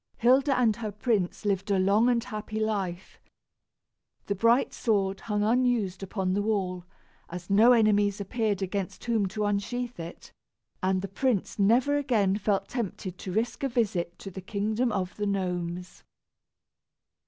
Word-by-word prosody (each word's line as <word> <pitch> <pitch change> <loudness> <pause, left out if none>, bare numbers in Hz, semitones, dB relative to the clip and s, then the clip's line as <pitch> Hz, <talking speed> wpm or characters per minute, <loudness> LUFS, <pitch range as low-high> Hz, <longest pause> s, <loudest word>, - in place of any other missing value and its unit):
Hilda 265 +4 +4
and 225 -4 +3
her 220 -3 -4
prince 210 -2 -1
lived 200 0 0
a 200 - +3
long 200 +6 +3
and 235 -2 +2
happy 215 -2 -5
life. 195 -5 -3 1.1
The 200 - -1
bright 230 +6 +3
sword 195 -4 0
hung 210 -1 -1
unused 230 -5 +1
upon 190 -1 -2
the 205 - +1
wall, 190 -4 -1 0.4
as 175 +2 -7
no 220 +5 +6
enemies 205 -3 +3
appeared 205 -1 -1
against 190 0 -4
whom 225 -4 +1
to 210 +2 -2
unsheath 235 +3 -2
it, 165 +1 -9 0.5
and 185 0 +1
the - - -2
prince 220 0 -1
never 245 +8 +3
again 220 -9 +2
felt 205 -1 0
tempted 200 -6 -4
to 185 - -5
risk 220 +5 -1
a 275 - 0
visit 195 -8 -1
to 195 - -8
the 190 - -7
kingdom 215 +5 -1
of 190 -3 -2
the 205 -1 -1
gnomes. 180 -2 -3
205 Hz, 155 wpm, -28 LUFS, 190-230 Hz, 1.1 s, no